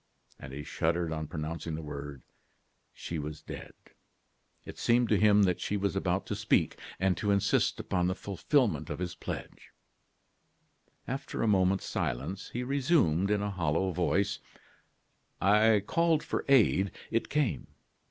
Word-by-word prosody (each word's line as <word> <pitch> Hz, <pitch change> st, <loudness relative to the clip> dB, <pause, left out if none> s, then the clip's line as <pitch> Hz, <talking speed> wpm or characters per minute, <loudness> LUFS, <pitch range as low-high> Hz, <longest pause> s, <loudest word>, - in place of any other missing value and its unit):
And 65 Hz, -, -9 dB
he 70 Hz, +2 st, -6 dB
shuddered 85 Hz, +2 st, -1 dB
on 80 Hz, -1 st, -4 dB
pronouncing 80 Hz, +1 st, -4 dB
the 80 Hz, -, -6 dB
words: 70 Hz, -2 st, -7 dB, 0.7 s
"She 85 Hz, -, -5 dB
was 75 Hz, +1 st, -6 dB
dead." -, -, -8 dB, 0.9 s
It -, -, -9 dB
seemed 120 Hz, 0 st, +3 dB
to 105 Hz, -, +3 dB
him 105 Hz, -1 st, +5 dB
that 90 Hz, -3 st, +1 dB
she 105 Hz, -, -1 dB
was 100 Hz, -3 st, -1 dB
about -, -, 0 dB
to -, -, -3 dB
speak, -, -, +1 dB, 0.2 s
and 95 Hz, -1 st, +2 dB
to 105 Hz, -, -1 dB
insist 100 Hz, -1 st, +2 dB
upon 90 Hz, -2 st, 0 dB
the 90 Hz, -, 0 dB
fulfilment 110 Hz, -, 0 dB
of -, -, -3 dB
his 90 Hz, -1 st, -3 dB
pledge. -, -, -7 dB, 1.4 s
After 135 Hz, +2 st, -3 dB
a -, -, +2 dB
moment's 95 Hz, -2 st, +2 dB
silence, 90 Hz, -, -3 dB
he 125 Hz, -, -3 dB
resumed, 125 Hz, -, +2 dB
in 105 Hz, -1 st, +1 dB
a 105 Hz, -, -2 dB
hollow 90 Hz, 0 st, 0 dB
voice: 95 Hz, +4 st, 0 dB, 1.0 s
"I 105 Hz, +1 st, +4 dB
called 165 Hz, +1 st, +2 dB
for -, -, -3 dB
aid; 110 Hz, -7 st, +4 dB, 0.2 s
it 115 Hz, -, 0 dB
came. 135 Hz, -, 0 dB
95 Hz, 150 wpm, -30 LUFS, 80-110 Hz, 1.4 s, him